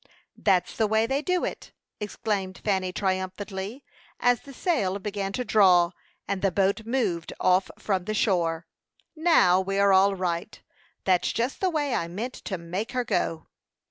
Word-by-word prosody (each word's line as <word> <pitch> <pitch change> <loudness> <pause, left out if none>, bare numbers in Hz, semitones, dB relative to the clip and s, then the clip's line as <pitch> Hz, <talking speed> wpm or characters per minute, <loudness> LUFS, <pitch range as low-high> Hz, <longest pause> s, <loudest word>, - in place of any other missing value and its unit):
"That's 190 -4 +1
the 220 - +2
way 220 +1 +2
they 270 +4 0
do 365 +2 0
it!" - - -7 0.3
exclaimed 200 -2 -3
Fanny, 190 -3 +1
triumphantly, 190 +4 -3 0.4
as 245 -1 +3
the 280 - -12
sail 250 - 0
began 200 -1 -3
to 250 - -2
draw, 180 -6 +5 0.4
and 195 -1 -2
the 195 - +2
boat 200 +4 +1
moved 210 -10 -1
off 185 +1 +3
from 190 -4 -1
the 215 - -2
shore. 170 -5 +1 0.5
"Now, 310 - +4
we 195 +1 -2
are 200 -1 +5
all 195 +1 +5
right. 175 -2 -3 0.4
That's 185 -2 +2
just 240 +4 -2
the 375 - +3
way 295 -5 -1
I 165 - 0
meant 220 +9 -5
to 190 - -3
make 185 +8 -4
her 250 -1 0
go." 165 -8 -1
195 Hz, 165 wpm, -26 LUFS, 185-230 Hz, 0.5 s, draw